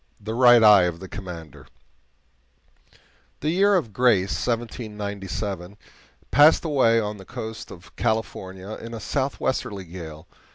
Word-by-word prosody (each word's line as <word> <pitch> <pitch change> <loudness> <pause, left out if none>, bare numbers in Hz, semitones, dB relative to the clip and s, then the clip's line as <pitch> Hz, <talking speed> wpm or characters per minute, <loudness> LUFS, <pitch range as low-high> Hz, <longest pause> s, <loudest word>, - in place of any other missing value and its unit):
THE 110 +2 -5
RIGHT 120 -1 +6
EYE 105 -3 +8
OF 85 -1 -3
THE 95 - -9
COMMANDER 85 -7 -9 1.7
The 150 - 0
year 200 +3 +3
of 120 - -1
grace 105 -5 +3 0.2
1797 105 -5 -4 0.5
passed 150 +5 +6
away 130 -7 +3
on 105 -1 -3
the 95 - -11
coast 110 +4 -7
of 90 -1 -14
California 95 -3 -3
in 115 0 -7
a - - -6
southwesterly 130 -7 -2
gale. 80 -3 -10
105 Hz, 125 wpm, -24 LUFS, 95-120 Hz, 1.7 s, EYE